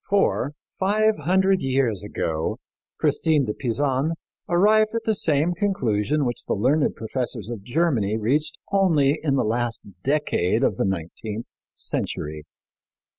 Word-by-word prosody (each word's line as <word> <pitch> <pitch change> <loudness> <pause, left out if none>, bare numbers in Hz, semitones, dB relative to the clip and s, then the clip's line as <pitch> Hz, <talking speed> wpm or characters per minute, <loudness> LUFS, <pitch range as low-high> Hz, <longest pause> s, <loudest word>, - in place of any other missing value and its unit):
For 195 -8 +2 0.3
five 215 +3 +3
hundred 190 +1 +3
years 130 -7 0
ago 80 -6 -2 0.4
Christine 155 -4 +2
de 105 - -2
Pisan 135 +6 0 0.4
arrived 215 +5 +4
at 230 - -1
the 220 - +2
same 160 -3 +1
conclusion 150 - 0
which 120 -1 -3
the - - 0
learned 140 +8 +2
professors 120 -1 -4
of 115 -4 -5
Germany 120 -5 +1
reached 135 +8 0
only 160 -7 +3
in 140 -3 +1
the 135 - +2
last 115 +1 0 0.2
decade 130 - +1
of 105 - +1
the - - +1
nineteenth 95 +5 -4 0.3
century. 75 0 -3
135 Hz, 130 wpm, -24 LUFS, 110-170 Hz, 0.4 s, arrived